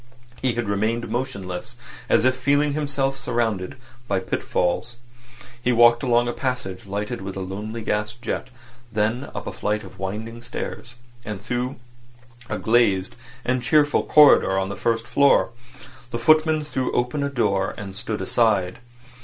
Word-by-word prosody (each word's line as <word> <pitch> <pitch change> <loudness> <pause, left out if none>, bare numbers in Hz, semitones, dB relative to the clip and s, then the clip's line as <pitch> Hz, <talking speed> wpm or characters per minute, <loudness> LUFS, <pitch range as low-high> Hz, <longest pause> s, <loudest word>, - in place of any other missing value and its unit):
He 130 -2 +1
had 120 -3 -2
remained 110 +4 -1
motionless, 100 -8 -4 0.3
as - - +4
if 130 0 +4
feeling 145 +3 +2
himself 140 -2 0
surrounded 110 -8 -1 0.3
by 100 -2 +1
pitfalls. 95 +5 -1 0.6
He 125 - +2
walked 120 0 +6
along 120 -2 +2
a 120 - -1
passage 125 -8 -4
lighted 105 +3 -3
by 95 0 -5
a - - -3
lonely 105 +4 -5
gas 105 +1 -1
jet, 120 +1 -4 0.4
then 110 +5 0
up 100 - -5
a - - -4
flight 105 +1 -1
of 95 -1 -13
winding 110 +5 -5
stairs, 120 0 -6 0.3
and 105 -3 -5
through 125 +5 -3 0.7
a - - -2
glazed 110 -5 +2 0.3
and 125 0 +1
cheerful 145 +3 +3
corridor 145 -10 +6
on 95 0 0
the 100 - -4
first 115 0 0
floor. 140 -2 +4 0.6
The 120 - -3
footman 155 +5 +4
threw 130 -3 -2
open 125 +4 0
a 140 - 0
door, 100 -8 0
and 100 -2 -7
stood 110 -1 -4
aside. 95 -2 +1
115 Hz, 155 wpm, -23 LUFS, 100-130 Hz, 0.7 s, walked